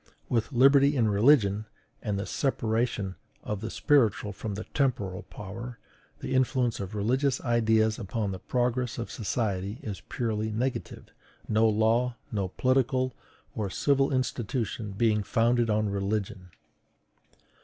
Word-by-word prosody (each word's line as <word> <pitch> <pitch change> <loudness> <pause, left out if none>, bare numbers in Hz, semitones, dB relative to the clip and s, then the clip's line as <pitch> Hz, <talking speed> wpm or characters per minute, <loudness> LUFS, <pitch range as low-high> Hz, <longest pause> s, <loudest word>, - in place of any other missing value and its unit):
With 115 -2 0
liberty 140 +3 +5
in 115 -5 +3
religion, 105 -2 +4 0.3
and 105 -2 -2
the 100 - -3
separation 110 -6 -1 0.3
of 105 -2 -4
the 110 - -4
spiritual 110 -8 +2
from 105 +1 -5
the 105 - -5
temporal 105 -10 -1
power, 115 +4 -7 0.4
the - - -3
influence 130 -2 +1
of 100 +1 -5
religious 130 +6 +1
ideas 110 -2 +2
upon 105 -1 -2
the 95 - -5
progress 125 +2 -1
of 115 - -5
society 100 -2 -2
is 100 -3 -5
purely 110 -3 -1
negative; 120 +4 -3 0.4
no 110 +1 +3
law, 115 +3 +2 0.2
no 100 -4 -1
political 130 +4 +1 0.4
or 105 -3 -2
civil 135 +7 +2
institution 120 -4 -2
being 105 +1 +2
founded 115 +3 +2
on 105 0 +2
religion. 100 -2 -3
110 Hz, 130 wpm, -28 LUFS, 105-125 Hz, 0.4 s, liberty